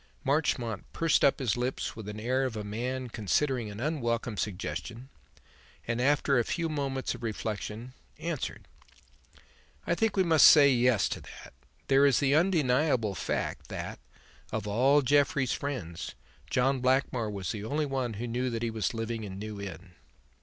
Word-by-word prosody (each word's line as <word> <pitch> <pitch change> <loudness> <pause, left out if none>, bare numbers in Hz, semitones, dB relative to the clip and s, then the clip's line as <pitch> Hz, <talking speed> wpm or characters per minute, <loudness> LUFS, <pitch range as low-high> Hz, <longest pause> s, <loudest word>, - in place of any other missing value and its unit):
Marchmont 135 -7 0
pursed 165 -2 +2
up 140 - +5
his 125 -6 0
lips 125 +2 -2
with 110 -2 -8
the 105 +1 -6
air 130 +3 +1
of 130 -4 -2
a 105 - -4
man 125 +5 -3
considering 115 - 0
an 100 +1 -8
unwelcome 120 -6 -1
suggestion, 110 +5 -4 0.8
and, 115 +1 -1
after 140 -1 +3
a - - +2
few 170 +7 -2
moments 135 -3 -2
of 120 - -10
reflection, 110 +1 -4 0.2
answered: - - -4 1.2
"I - - +1
think 220 +3 0
we 190 - +5
must 160 -4 +7
say 145 -2 +8
'yes' 125 -3 +3
to - - -4
that. - - -12 0.3
There 135 +1 +5
is 135 - +3
the 140 -1 +2
undeniable 145 - +2
fact - - -3
that, - - -6 0.5
of 110 -2 -3
all 135 +7 +4
Jeffrey's 140 0 +2
friends, 120 - -5 0.3
John 135 +1 +2
Blackmore 130 -3 +1
was 100 -4 -4
the 105 -2 -5
only 150 +7 -1
one 130 -4 -2
who 115 +4 -4
knew 125 +2 -1
that 115 -1 -3
he 115 - -1
was 110 0 -2
living 115 0 -3
in 95 -2 -7
New 105 0 -6
Inn." 90 -1 -8
125 Hz, 165 wpm, -29 LUFS, 110-140 Hz, 1.2 s, say